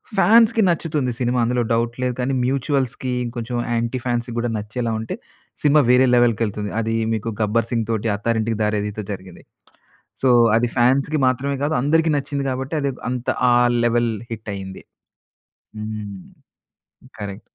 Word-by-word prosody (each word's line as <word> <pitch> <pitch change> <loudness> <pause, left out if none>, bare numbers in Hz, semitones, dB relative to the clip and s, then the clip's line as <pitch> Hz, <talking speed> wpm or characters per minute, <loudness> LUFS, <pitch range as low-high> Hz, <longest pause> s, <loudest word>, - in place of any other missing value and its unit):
ఫాన్స్‌కి 225 +4 +5
నచ్చుతుంది 155 -6 0
సినిమా 125 0 +1
అందులో 120 +1 +1
డౌట్ 115 0 0
లేదు. 125 - 0
కానీ, 130 +2 0
మ్యూచుయల్స్‌కి, 130 -1 -1
ఇంకొంచెం 120 0 -5 0.2
యాంటీ 120 +2 -1
ఫాన్స్‌కి 120 -1 -1
గూడా 120 0 -1
నచ్చేలా 115 +3 -3
ఉంటే 110 - -4 0.5
సినిమా 150 0 +5
వేరే 125 +1 +5
లెవెల్‌కేళ్తుంది. 110 -3 +1
అది 115 0 -1 0.2
మీకు 110 +1 -2
'గబ్బర్ 110 +2 +1
సింగ్' 115 -2 -1
తోటి, 110 0 -1
'అత్తారింటికి 110 +1 -1
దారేదితో' 105 0 -2
జరిగింది. 95 -2 -11 0.8
సో 130 - +3 0.3
అది 120 +1 +2
ఫాన్స్‌కి 135 +5 +2
మాత్రమే 135 +2 0
కాదు, 155 - 0
అందరికి 160 +2 +2
నచ్చింది. 140 0 -2
కాబట్టి, 130 +4 -4
అది‌ 140 -1 0
ఒక - - -16
అంత 125 -1 -4 0.2
ఆ - - +5 0.3
లెవెల్ 120 -1 +2 0.2
హిట్ 110 -1 -6
అయింది. 95 -1 -8 1.0
హ్మ్. 105 -2 -6 1.0
కరెక్ట్. 100 0 -6
120 Hz, 145 wpm, -21 LUFS, 110-135 Hz, 1.0 s, ఫాన్స్‌కి